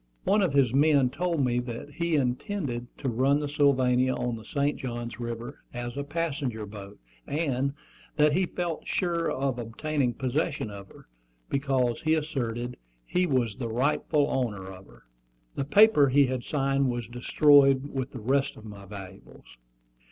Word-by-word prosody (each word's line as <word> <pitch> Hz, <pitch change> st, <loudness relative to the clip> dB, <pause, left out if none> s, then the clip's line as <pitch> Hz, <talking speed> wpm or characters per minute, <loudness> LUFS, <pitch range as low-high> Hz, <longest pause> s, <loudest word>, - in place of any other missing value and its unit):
One 205 Hz, +1 st, +3 dB
of 180 Hz, -7 st, +1 dB
his 135 Hz, -4 st, +3 dB
men 140 Hz, -2 st, +4 dB
told 170 Hz, -3 st, 0 dB
me 120 Hz, -1 st, +1 dB
that 120 Hz, +3 st, -6 dB
he 170 Hz, +2 st, -1 dB
intended 125 Hz, -1 st, -2 dB
to 135 Hz, -, -4 dB
run 130 Hz, +4 st, +2 dB
the 150 Hz, -, -2 dB
Sylvania 130 Hz, -3 st, +3 dB
on 120 Hz, -1 st, -2 dB
the 110 Hz, -, -9 dB
St. 140 Hz, +5 st, 0 dB
Johns 120 Hz, -2 st, -5 dB
River 120 Hz, 0 st, -5 dB, 0.2 s
as 120 Hz, 0 st, -4 dB
a 140 Hz, -, -3 dB
passenger 140 Hz, -7 st, -3 dB
boat, 100 Hz, -1 st, -10 dB, 0.3 s
and 140 Hz, -3 st, -1 dB, 0.4 s
that 150 Hz, 0 st, +4 dB
he 185 Hz, +2 st, +2 dB
felt 170 Hz, -2 st, -4 dB
sure 170 Hz, -3 st, 0 dB
of 135 Hz, -2 st, -1 dB
obtaining 125 Hz, +2 st, -1 dB
possession 135 Hz, -1 st, -1 dB
of 100 Hz, -1 st, -9 dB
her, -, -, -17 dB, 0.4 s
because, 135 Hz, -4 st, 0 dB
he 160 Hz, 0 st, +2 dB
asserted, 125 Hz, -6 st, -3 dB, 0.3 s
he 180 Hz, 0 st, +1 dB
was 125 Hz, -8 st, 0 dB
the 120 Hz, -3 st, -4 dB
rightful 140 Hz, +4 st, +1 dB
owner 105 Hz, -7 st, -2 dB
of 95 Hz, +1 st, -13 dB
her. -, -, -19 dB, 0.5 s
The 135 Hz, -, -2 dB
paper 150 Hz, -3 st, +6 dB
he 140 Hz, +2 st, +5 dB
had 130 Hz, -1 st, -3 dB
signed 135 Hz, -2 st, +1 dB
was 120 Hz, -2 st, -3 dB
destroyed 135 Hz, +2 st, +4 dB
with 135 Hz, -1 st, -2 dB
the 130 Hz, -, -8 dB
rest 135 Hz, +5 st, 0 dB
of 110 Hz, -, -12 dB
my 100 Hz, -2 st, -10 dB
valuables. 95 Hz, -, -11 dB
130 Hz, 165 wpm, -27 LUFS, 120-145 Hz, 0.5 s, paper